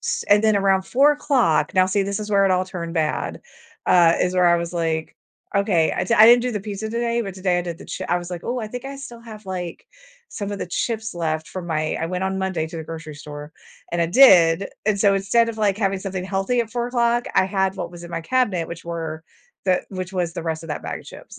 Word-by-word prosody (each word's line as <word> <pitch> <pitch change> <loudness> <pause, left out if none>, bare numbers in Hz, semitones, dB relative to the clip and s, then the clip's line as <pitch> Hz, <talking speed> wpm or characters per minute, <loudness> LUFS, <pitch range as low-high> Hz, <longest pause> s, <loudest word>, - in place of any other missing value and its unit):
s - - -2
and 205 +1 +6
then 215 -1 +4
around 195 -1 +2
04:00 265 - +2
now, 185 - +5
see, 190 +2 +1
this 200 +1 -2
is 210 0 -6
where 200 -1 +4
it - - +1
all 185 0 +2
turned 170 -3 -6
bad 155 -2 -1 0.4
uh, 170 -2 +5
is 180 - 0
where 180 -1 +4
I 170 0 +5
was 170 0 -4
like, 160 -2 -2 0.4
"Okay" 195 -5 +2
I 180 - 0
d 230 - +1
I 220 - +8
didn't 240 +1 +8
do 250 - -1
the 210 - -2
pizza 205 +1 -5
today, 235 +1 -1
but 195 -4 -5
today 185 -2 0
I - - -1
did 170 -2 -5
the - - -12
chi 185 - -5
I 175 - +2
was 175 0 -8
like, 175 -1 -5
"Oh, 245 +2 -2
I 220 -3 -4
think 245 +4 -7
I 275 - -6
still 255 -4 -10
have, 220 -2 -11
like, 180 -2 -5 0.5
some 200 -1 -5
of 200 - -5
the - - -4
chips 220 +5 -2
left 160 -1 -2
from 185 -1 -6
my" 155 -2 -1
I 165 - -1
went 180 +2 -2
on 190 0 -2
Monday 190 -4 -1
to 165 - -8
the 160 - -6
grocery 160 -1 -8
store, 150 +1 -9 0.4
and 175 - 0
I 170 - +2
did, 180 -4 +6 0.2
and 210 -2 +2
so, 200 0 +4
instead 200 +4 +2
of, 220 - -10
like, 205 -3 +2
having 195 -2 0
something 190 -1 -4
healthy 195 +5 0
at 225 -2 -4
04:00, 240 0 0
I - - +5
had 190 0 0
what - - -4
was 175 -1 -11
in 170 - -10
my 165 -1 -4
cabinet, 205 -5 0
which 170 0 -7
were 165 -2 -5 0.4
the 185 -1 +2
which 185 -1 -5
was 175 -3 -1
the 170 - -5
rest 160 -1 -3
of 165 - -10
that 150 - -4
bag - - -5
of - - -18
chips. - - -12
190 Hz, 260 wpm, -22 LUFS, 170-215 Hz, 0.5 s, I